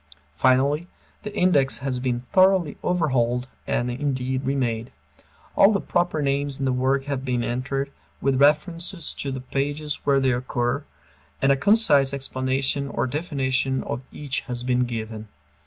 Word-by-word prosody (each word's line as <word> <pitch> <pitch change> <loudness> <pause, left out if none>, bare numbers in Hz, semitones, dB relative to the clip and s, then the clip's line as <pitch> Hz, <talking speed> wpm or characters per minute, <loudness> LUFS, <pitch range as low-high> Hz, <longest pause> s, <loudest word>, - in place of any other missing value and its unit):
Finally, 135 - +2 0.3
the 210 -1 -7
index 150 -7 +3
has 130 -2 -3
been 125 -1 -1
thoroughly 185 +3 +3
overhauled 130 -8 +1 0.2
and, 120 +1 0
indeed, 130 0 -2
remade. 125 -4 -1 0.6
All 200 - +6
the 200 - +1
proper 175 -5 0
names 140 0 0
in 135 - -2
the 130 - +1
work 135 +2 +1
have 140 -2 -3
been 125 -2 -1
entered, 135 +3 -2 0.3
with 135 -1 +1
references 165 +4 +1
to 140 - -4
the 130 -1 -4
pages 145 +3 -2
where 140 -1 +3
they 135 -1 +2
occur, 125 +2 -1 0.6
and 135 - +3
a - - +5
concise 145 -5 +4
explanation 135 +1 -1
or - - -1
definition 135 -2 -1
of - - -4
each 140 -3 -2
has 120 -1 -5
been 125 0 +1
given. 110 -2 -5
135 Hz, 150 wpm, -24 LUFS, 125-145 Hz, 0.6 s, All